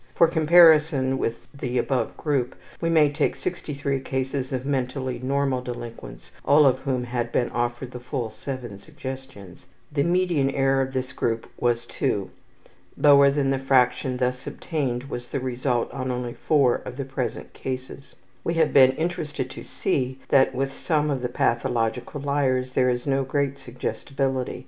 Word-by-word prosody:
For 170 Hz, -, +6 dB
comparison 155 Hz, -5 st, +5 dB
with 115 Hz, 0 st, -3 dB
the 125 Hz, -3 st, -3 dB
above 130 Hz, -1 st, -1 dB
group, 135 Hz, -5 st, -1 dB, 0.3 s
we 165 Hz, -, +1 dB
may 155 Hz, -3 st, +4 dB
take 145 Hz, 0 st, 0 dB
63 145 Hz, -6 st, -3 dB
cases 130 Hz, 0 st, -3 dB
of 130 Hz, -1 st, -3 dB
mentally 130 Hz, -2 st, -2 dB
normal 135 Hz, -1 st, 0 dB
delinquents, 115 Hz, -, -8 dB
all 145 Hz, +1 st, +5 dB
of 130 Hz, -1 st, +4 dB
whom 130 Hz, -2 st, -1 dB
had 120 Hz, -1 st, -3 dB
been 120 Hz, -, 0 dB
offered 120 Hz, +1 st, -2 dB
the 125 Hz, -, -7 dB
full 120 Hz, -2 st, -4 dB
7 120 Hz, -4 st, -6 dB
suggestions. 115 Hz, -6 st, -9 dB, 0.2 s
The 145 Hz, -1 st, 0 dB
median 170 Hz, -5 st, +2 dB
error 135 Hz, 0 st, +2 dB
of 135 Hz, 0 st, -3 dB
this 130 Hz, 0 st, -3 dB
group 115 Hz, -3 st, -1 dB
was 120 Hz, -1 st, +1 dB
two. 105 Hz, -8 st, -2 dB, 0.7 s
Lower 140 Hz, -1 st, +7 dB
than 140 Hz, -1 st, +1 dB
the 135 Hz, -, 0 dB
fraction 130 Hz, -1 st, +2 dB
thus 125 Hz, 0 st, -1 dB
obtained 130 Hz, -7 st, -2 dB
was 125 Hz, -3 st, -6 dB
the 140 Hz, -, -3 dB
result 125 Hz, -1 st, -1 dB
on 130 Hz, -1 st, -4 dB
only 125 Hz, -1 st, -3 dB
4 140 Hz, -4 st, +2 dB
of 125 Hz, -, -9 dB
the 140 Hz, -, -3 dB
present 130 Hz, -2 st, -4 dB
cases. 130 Hz, +1 st, -6 dB, 0.3 s
We 170 Hz, -, -1 dB
have 160 Hz, -1 st, +2 dB
been 130 Hz, -1 st, +7 dB
interested 150 Hz, -5 st, -3 dB
to -, -, -8 dB
see 130 Hz, -1 st, -1 dB
that 135 Hz, -1 st, +4 dB
with 135 Hz, +1 st, -1 dB
some 150 Hz, 0 st, 0 dB
of 135 Hz, -3 st, -1 dB
the 125 Hz, -, -2 dB
pathological 115 Hz, +3 st, -1 dB
liars 135 Hz, -3 st, 0 dB
there 125 Hz, -1 st, +3 dB
is 120 Hz, 0 st, -1 dB
no 135 Hz, -1 st, +1 dB
great 140 Hz, +1 st, -1 dB
suggestibility. 130 Hz, +1 st, -3 dB
130 Hz, 165 wpm, -24 LUFS, 125-140 Hz, 0.7 s, Lower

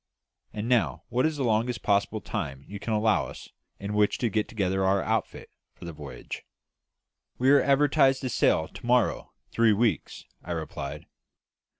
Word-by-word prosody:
And 105 Hz, +1 st, -4 dB
now, 125 Hz, -2 st, +1 dB
what 125 Hz, +5 st, +2 dB
is 155 Hz, -1 st, -3 dB
the 140 Hz, -, -1 dB
longest 120 Hz, +1 st, 0 dB
possible 100 Hz, +1 st, +1 dB
time 70 Hz, -10 st, -5 dB
you 100 Hz, 0 st, -7 dB
can 115 Hz, -, -4 dB
allow 110 Hz, -1 st, +2 dB
us -, -, -11 dB, 0.3 s
in 100 Hz, +1 st, -4 dB
which 105 Hz, 0 st, +2 dB
to 120 Hz, -, 0 dB
get 105 Hz, +1 st, 0 dB
together 95 Hz, -3 st, -1 dB
our 95 Hz, 0 st, +2 dB
outfit -, -, -2 dB, 0.2 s
for -, -, -11 dB
the 85 Hz, -, -6 dB
voyage?" 75 Hz, -2 st, -8 dB, 0.9 s
"We 130 Hz, +2 st, +3 dB
are 140 Hz, -1 st, +6 dB
advertised 135 Hz, -1 st, +3 dB
to 130 Hz, -, -2 dB
sail 80 Hz, -7 st, +2 dB
to -, -, -13 dB
morrow 125 Hz, -2 st, +2 dB, 0.2 s
three 115 Hz, -2 st, +4 dB
weeks," 105 Hz, -, -1 dB, 0.2 s
I 85 Hz, -, -4 dB
replied. 75 Hz, -3 st, -5 dB
110 Hz, 170 wpm, -27 LUFS, 95-125 Hz, 0.9 s, are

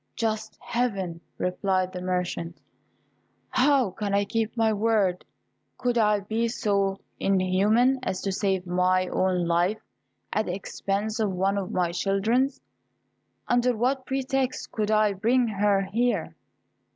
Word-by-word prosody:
"Just 220 Hz, -1 st, -2 dB
Heaven!" 200 Hz, -9 st, -2 dB, 0.2 s
replied 185 Hz, 0 st, 0 dB
the 180 Hz, -, -5 dB
merchant; 180 Hz, -2 st, -3 dB, 0.9 s
"how 260 Hz, -5 st, +3 dB
can 200 Hz, +1 st, -2 dB
I 200 Hz, 0 st, +2 dB
keep 225 Hz, +2 st, -2 dB
my 220 Hz, -1 st, +3 dB
word? 205 Hz, -4 st, +1 dB, 0.5 s
Could 245 Hz, -1 st, 0 dB
I 210 Hz, -3 st, +3 dB
be 220 Hz, +4 st, -1 dB
so 200 Hz, -4 st, 0 dB, 0.2 s
inhuman 200 Hz, +7 st, +3 dB
as 190 Hz, -7 st, -2 dB
to 195 Hz, -, -1 dB
save 190 Hz, -1 st, 0 dB
my 185 Hz, +1 st, +2 dB
own 185 Hz, -2 st, +1 dB
life 175 Hz, +5 st, +1 dB, 0.5 s
at 215 Hz, -, 0 dB
the 180 Hz, -, -2 dB
expense 200 Hz, +2 st, -3 dB
of 215 Hz, -3 st, +1 dB
one 190 Hz, +2 st, 0 dB
of 195 Hz, -2 st, -2 dB
my 175 Hz, -2 st, 0 dB
children's; 215 Hz, +9 st, +1 dB, 0.9 s
under 245 Hz, -1 st, +2 dB
what 260 Hz, +3 st, 0 dB
pretext 265 Hz, -1 st, -1 dB
could 215 Hz, -1 st, -1 dB
I 215 Hz, -1 st, +3 dB
bring 235 Hz, +5 st, +2 dB
her 205 Hz, -2 st, +2 dB
here?" 235 Hz, +6 st, -1 dB
205 Hz, 135 wpm, -26 LUFS, 185-230 Hz, 0.9 s, how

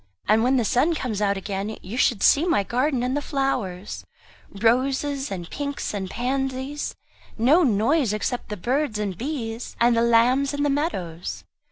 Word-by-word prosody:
And 215 Hz, +1 st, +4 dB
when 260 Hz, +2 st, +3 dB
the 240 Hz, -, +1 dB
sun 300 Hz, +10 st, +2 dB
comes 225 Hz, -8 st, -3 dB
out 200 Hz, -1 st, +1 dB
again, 200 Hz, +2 st, -4 dB
you 195 Hz, +6 st, -6 dB
should 240 Hz, -4 st, +2 dB
see 290 Hz, -, +5 dB
my 335 Hz, -, +2 dB
garden 255 Hz, +4 st, 0 dB
and 255 Hz, +2 st, 0 dB
the 290 Hz, -, 0 dB
flowers 250 Hz, -10 st, -2 dB, 0.5 s
roses 265 Hz, +6 st, +1 dB
and 175 Hz, -3 st, -5 dB
pinks 285 Hz, -4 st, -3 dB
and 190 Hz, -2 st, -3 dB
pansies 265 Hz, +4 st, -2 dB, 0.4 s
no 270 Hz, +10 st, +5 dB
noise 245 Hz, -, +2 dB
except 225 Hz, +4 st, -2 dB
the 210 Hz, -, -4 dB
birds 255 Hz, -, 0 dB
and 205 Hz, -3 st, -2 dB
bees, 235 Hz, -, -5 dB
and 235 Hz, 0 st, +4 dB
the 230 Hz, -, +3 dB
lambs 245 Hz, +5 st, +3 dB
in 285 Hz, -, -1 dB
the 290 Hz, -, +2 dB
meadows." 175 Hz, -, -3 dB
245 Hz, 170 wpm, -24 LUFS, 210-275 Hz, 0.5 s, see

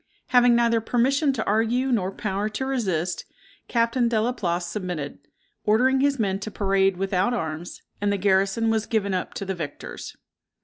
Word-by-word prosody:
Having 245 Hz, -1 st, +5 dB
neither 230 Hz, -1 st, +3 dB
permission 270 Hz, +6 st, +2 dB
to 220 Hz, -4 st, -2 dB
argue, 230 Hz, +5 st, +1 dB
nor 195 Hz, -6 st, +1 dB
power 205 Hz, +1 st, -2 dB
to 265 Hz, +5 st, -3 dB
resist, 185 Hz, -10 st, -1 dB, 0.4 s
Captain 235 Hz, +1 st, +2 dB
De 230 Hz, -2 st, +1 dB
la 230 Hz, +3 st, +1 dB
Place 175 Hz, -7 st, -2 dB
submitted, 175 Hz, -6 st, -4 dB, 0.4 s
ordering 255 Hz, +5 st, +3 dB
his 280 Hz, 0 st, +2 dB
men 195 Hz, -4 st, 0 dB
to 210 Hz, -, -5 dB
parade 195 Hz, -2 st, +1 dB
without 195 Hz, +4 st, +1 dB
arms, 160 Hz, -3 st, -5 dB, 0.2 s
and 205 Hz, 0 st, +1 dB
the 200 Hz, -, +1 dB
garrison 195 Hz, +3 st, +2 dB
was 220 Hz, -1 st, 0 dB
given 200 Hz, -3 st, 0 dB
up 185 Hz, -, -3 dB
to 200 Hz, -, -4 dB
the 190 Hz, -, -2 dB
victors. 155 Hz, -5 st, -7 dB
210 Hz, 170 wpm, -24 LUFS, 190-235 Hz, 0.4 s, Having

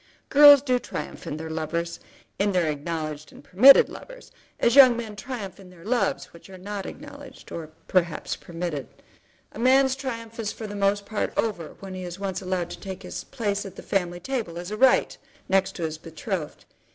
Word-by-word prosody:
Girls 290 Hz, -1 st, +9 dB
do 255 Hz, -3 st, +1 dB
triumph 150 Hz, -, -7 dB
in 150 Hz, -, -4 dB
their 160 Hz, 0 st, -6 dB
lovers, 170 Hz, +2 st, -3 dB, 0.4 s
in 200 Hz, 0 st, +1 dB
their 180 Hz, -2 st, +2 dB
acknowledged 155 Hz, 0 st, -5 dB
and -, -, -15 dB
permitted 255 Hz, +9 st, +8 dB
lovers, -, -, -12 dB, 0.3 s
as 235 Hz, +1 st, +3 dB
young 255 Hz, -4 st, +8 dB
men 220 Hz, -3 st, -6 dB
triumph 210 Hz, -4 st, -7 dB
in 190 Hz, -2 st, -13 dB
their 180 Hz, -1 st, -16 dB
loves 240 Hz, +2 st, -1 dB
which 170 Hz, +3 st, -15 dB
are 190 Hz, -, -10 dB
not 200 Hz, +1 st, -6 dB
acknowledged 285 Hz, -2 st, -11 dB
or 160 Hz, -2 st, -6 dB, 0.2 s
perhaps 175 Hz, -3 st, 0 dB
permitted. 165 Hz, -5 st, -5 dB, 0.6 s
A -, -, -10 dB
man's 265 Hz, +2 st, +4 dB
triumph 230 Hz, -4 st, -6 dB
is 215 Hz, -2 st, -2 dB
for 220 Hz, -, -8 dB
the 205 Hz, -, -6 dB
most 200 Hz, 0 st, +1 dB
part 215 Hz, +1 st, -2 dB
over 195 Hz, -8 st, -2 dB
when 195 Hz, -1 st, -7 dB
he 185 Hz, 0 st, -6 dB
is 175 Hz, 0 st, -6 dB
once 195 Hz, -1 st, -3 dB
allowed 185 Hz, -2 st, -2 dB
to -, -, -8 dB
take 190 Hz, -1 st, -7 dB
his 180 Hz, -, -6 dB
place 205 Hz, -6 st, -2 dB
at 195 Hz, -2 st, -9 dB
the -, -, -10 dB
family 175 Hz, -2 st, -1 dB
table, 215 Hz, -5 st, -4 dB
as 175 Hz, +3 st, -6 dB
a -, -, -2 dB
right, 260 Hz, +4 st, +4 dB, 0.3 s
next 195 Hz, 0 st, +1 dB
to 175 Hz, -, -5 dB
his 160 Hz, -1 st, -3 dB
betrothed. 165 Hz, 0 st, -5 dB
195 Hz, 195 wpm, -25 LUFS, 170-235 Hz, 0.6 s, Girls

